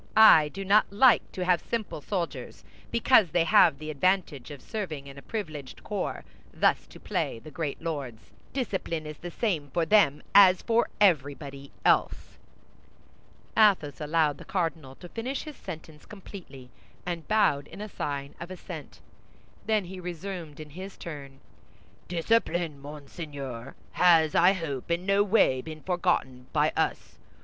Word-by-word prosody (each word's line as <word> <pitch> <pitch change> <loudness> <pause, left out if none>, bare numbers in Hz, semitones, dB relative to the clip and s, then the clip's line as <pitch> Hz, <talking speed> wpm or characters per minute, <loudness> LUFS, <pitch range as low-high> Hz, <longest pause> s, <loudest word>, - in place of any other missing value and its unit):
I 160 -9 +8
do 195 +5 -7
not 205 +2 +4
like 235 +4 +4
to 185 - -3
have 180 -2 +3
simple 220 -9 -4
soldiers, 180 +1 -4 0.3
because 235 -4 +4
they 170 +2 +2
have 155 -3 +5
the 155 +1 -6
advantage 155 -3 0
of 145 -2 -9
serving 160 - -5
in 140 -1 -11
a 140 - -10
privileged 155 - -6
corps, - - -3 0.3
thus - - +1
to - - -14
play - - -2
the 155 +7 -12
great 150 -1 -4
lords; 140 -9 -5 0.2
discipline 190 - -3
is 150 0 -8
the 175 - -6
same 170 -7 -2
for 170 +3 0
them 160 -6 +4
as 185 -2 +7
for 230 +1 +2
everybody 140 -6 +1 0.2
else." - - +1 1.2
Athos 190 -10 +3
allowed 150 -1 +1
the - - -9
cardinal 165 -8 -3
to 175 - -11
finish 245 +8 -4
his 305 -2 -9
sentence 160 -6 -10
completely, 175 - -11 0.3
and 170 -2 -4
bowed 150 -10 +2
in 210 +1 -8
sign 140 -7 -4
of 170 - -7
assent. 185 - -9 0.7
Then 215 -3 +2
he 185 +1 -8
resumed 175 -3 -6
in 155 -1 -9
his 190 +5 -9
turn: 140 -4 -9 0.7
"Discipline, 175 -4 0
Monseigneur, 140 -4 -8 0.2
has, 165 -4 +4
I 180 +3 +5
hope, 155 -8 -5
in 170 +2 -1
no 195 +1 +3
way 195 - +3
been 155 +1 -9
forgotten 175 -9 -1
by - - +2
us. - - -2
165 Hz, 150 wpm, -27 LUFS, 145-195 Hz, 1.2 s, I